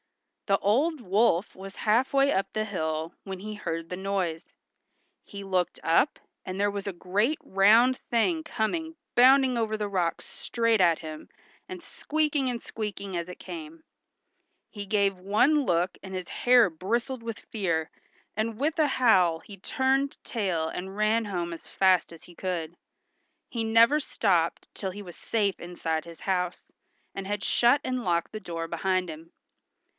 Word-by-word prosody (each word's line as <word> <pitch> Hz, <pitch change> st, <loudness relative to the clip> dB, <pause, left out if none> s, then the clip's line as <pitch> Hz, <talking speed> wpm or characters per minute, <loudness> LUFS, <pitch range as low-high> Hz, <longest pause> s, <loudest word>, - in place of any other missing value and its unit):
The 195 Hz, -1 st, +4 dB
old 280 Hz, +12 st, +1 dB
wolf 200 Hz, -3 st, +1 dB
was 195 Hz, +1 st, -10 dB
half 235 Hz, +5 st, +3 dB
way 275 Hz, 0 st, +3 dB
up 195 Hz, -, -1 dB
the 215 Hz, 0 st, -1 dB
hill 160 Hz, -4 st, -3 dB
when 190 Hz, -1 st, -6 dB
he 215 Hz, +2 st, -6 dB
heard 165 Hz, -5 st, -4 dB
the 180 Hz, -, -5 dB
noise. 185 Hz, -4 st, -2 dB, 0.8 s
He 200 Hz, -1 st, -9 dB
looked 180 Hz, -2 st, -1 dB
up, 170 Hz, -, +2 dB, 0.2 s
and 185 Hz, +1 st, -5 dB
there 205 Hz, 0 st, +2 dB
was 200 Hz, 0 st, -5 dB
a -, -, -1 dB
great 205 Hz, -, 0 dB
round 225 Hz, +7 st, +5 dB
thing 315 Hz, +8 st, +1 dB
coming 320 Hz, +5 st, -2 dB, 0.2 s
bounding 260 Hz, 0 st, +6 dB
over 220 Hz, -1 st, -1 dB
the 210 Hz, -1 st, -2 dB
rocks 180 Hz, -4 st, -1 dB
straight 230 Hz, -3 st, 0 dB
at 170 Hz, -3 st, +4 dB
him, 155 Hz, -1 st, -8 dB, 0.4 s
and 365 Hz, -1 st, -7 dB
squeaking 300 Hz, -5 st, -1 dB
and 240 Hz, -2 st, -3 dB
squeaking 200 Hz, -3 st, -5 dB
as 170 Hz, +1 st, -3 dB
it 180 Hz, -, -8 dB
came. 320 Hz, -1 st, -9 dB, 0.9 s
He 205 Hz, -2 st, -6 dB
gave 200 Hz, -2 st, +1 dB
one 245 Hz, +11 st, +3 dB
look 175 Hz, -4 st, 0 dB
and 190 Hz, -1 st, -8 dB
his 185 Hz, -1 st, -5 dB
hair 245 Hz, -1 st, +5 dB
bristled 230 Hz, -, -2 dB
with 230 Hz, -2 st, -5 dB
fear, 170 Hz, -7 st, -2 dB, 0.5 s
and 220 Hz, +1 st, -2 dB
with 310 Hz, +3 st, 0 dB
a 305 Hz, -, +4 dB
howl 190 Hz, -, +3 dB
he 200 Hz, +4 st, -12 dB
turned 265 Hz, +7 st, 0 dB
tail 185 Hz, -8 st, -1 dB
and 190 Hz, +4 st, -6 dB
ran 215 Hz, +2 st, +2 dB
home 175 Hz, -4 st, -3 dB
as 165 Hz, -, -11 dB
fast 185 Hz, -3 st, +3 dB
as 165 Hz, -, -13 dB
he 175 Hz, -, -14 dB
could. 170 Hz, -3 st, -3 dB, 0.7 s
He 230 Hz, -2 st, -3 dB
never 230 Hz, +6 st, +5 dB
stopped 175 Hz, -, 0 dB
till 190 Hz, -2 st, -4 dB
he 205 Hz, +2 st, -8 dB
was 175 Hz, -3 st, -11 dB
safe 205 Hz, -4 st, -1 dB
inside 165 Hz, -2 st, -3 dB
his 170 Hz, -1 st, -12 dB
house, 180 Hz, -2 st, -2 dB, 0.4 s
and 195 Hz, -, -5 dB
had 205 Hz, 0 st, -3 dB
shut 245 Hz, +4 st, +4 dB
and 255 Hz, -1 st, -2 dB
locked 170 Hz, -2 st, 0 dB
the 215 Hz, -, -4 dB
door 165 Hz, -4 st, -5 dB
behind 185 Hz, +2 st, 0 dB
him. 160 Hz, +1 st, -9 dB
200 Hz, 165 wpm, -27 LUFS, 180-235 Hz, 0.9 s, bounding